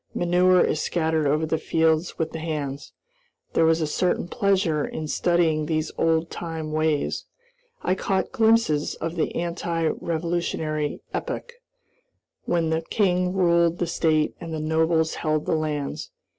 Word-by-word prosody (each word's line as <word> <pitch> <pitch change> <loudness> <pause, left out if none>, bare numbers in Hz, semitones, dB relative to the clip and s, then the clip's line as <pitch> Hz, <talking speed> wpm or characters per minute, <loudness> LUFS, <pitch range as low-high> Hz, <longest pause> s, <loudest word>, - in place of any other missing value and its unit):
Manure 180 +1 +4
is 155 - 0
scattered 160 -3 0
over 155 +3 +2
the 160 0 -1
fields 160 +1 +1
with 160 -1 -2
the 160 - -5
hands. 150 -3 -4 0.6
There 165 - +4
was 165 0 +3
a - - +2
certain 175 +3 0
pleasure 185 -6 +1
in 155 - -4
studying 160 -2 +1
these 155 0 -1
old 165 0 +1
time 160 -2 -5
ways. 155 -1 0 0.6
I - - +2
caught 190 0 -1
glimpses 220 -10 +2
of 165 +1 -4
the 165 - -1
anti 170 -1 -1
revolutionary 160 -2 -2
epoch, 485 - -4 0.9
when 165 -2 +1
the 160 0 +1
king 180 0 +1
ruled 170 -2 +3
the 175 - 0
state 155 -2 +1
and 165 -1 -6
the 160 - -3
nobles 160 +1 +1
held 155 -1 0
the - - 0
lands. 150 - -2
160 Hz, 145 wpm, -24 LUFS, 155-175 Hz, 0.9 s, Manure